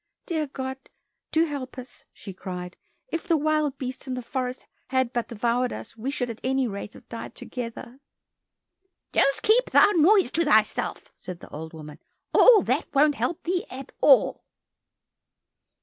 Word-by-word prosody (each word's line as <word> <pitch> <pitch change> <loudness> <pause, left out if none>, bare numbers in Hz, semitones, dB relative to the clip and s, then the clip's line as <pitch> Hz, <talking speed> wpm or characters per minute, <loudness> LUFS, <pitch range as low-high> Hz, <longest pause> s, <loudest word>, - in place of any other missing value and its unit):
"Dear 315 -4 -1
God, 265 -1 -5 0.5
do 320 +1 +3
help 275 -5 -6
us," 250 0 -10
she 195 - -9
cried. 180 -1 -7 0.3
"If 330 - -4
the 330 - +3
wild 305 -2 +1
beasts 260 0 -6
in 255 - -2
the 250 - -5
forest 255 +1 -4 0.2
had 260 -1 0
but 240 -1 -1
devoured 240 +2 0
us, - - -8
we 230 +4 -4
should 250 -4 -2
at 225 - -11
any 265 0 +1
rate 200 0 -6
have - - -15
died 230 - -8
together." 245 +1 -7 1.1
"Just 275 0 +3
keep 470 +4 +4
thy - - +6
noise 360 - +4
to 335 - +2
thyself," 220 -8 +1
said 180 -2 -8
the - - -13
old 160 +2 -8
woman, 150 -2 -10 0.3
"all 470 -5 +7
that 260 +7 0
won't 295 +2 +5
help 345 +4 -2
thee 360 +2 0
at 265 +1 -8
all." - - +5
260 Hz, 165 wpm, -25 LUFS, 235-305 Hz, 1.1 s, all